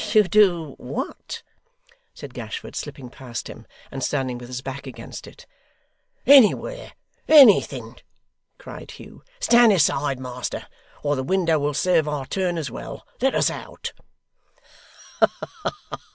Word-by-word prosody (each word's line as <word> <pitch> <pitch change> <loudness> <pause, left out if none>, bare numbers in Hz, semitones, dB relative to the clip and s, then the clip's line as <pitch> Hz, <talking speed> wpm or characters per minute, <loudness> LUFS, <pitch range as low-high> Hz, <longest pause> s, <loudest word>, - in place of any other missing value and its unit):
To 215 -2 +7
do 180 -7 +3
what?' 125 +3 -6 0.7
said - - -10
Gashford, 455 - -7
slipping 125 -3 -7
past 125 -4 -7
him, - - -11 0.2
and 135 -1 -5
standing 130 -4 -1
with 120 - -10
his 125 0 -5
back 135 +1 -6
against 115 -3 -9
it. - - -14 0.8
'Anywhere! 285 - +5 0.3
Anything!' 275 -9 +6 0.6
cried - - -10
Hugh. - - -12 0.2
'Stand 240 - +6
aside, 140 -5 +1
master, 125 -1 -5 0.4
or 145 0 +1
the 130 - -2
window 165 +1 +1
will 145 0 -1
serve 165 -1 +2
our 150 -3 -3
turn 180 +2 -1
as 145 -6 -4
well. - - -8 0.2
Let 265 +1 +2
us - - +2
out! - - -7
150 Hz, 125 wpm, -23 LUFS, 130-200 Hz, 0.8 s, To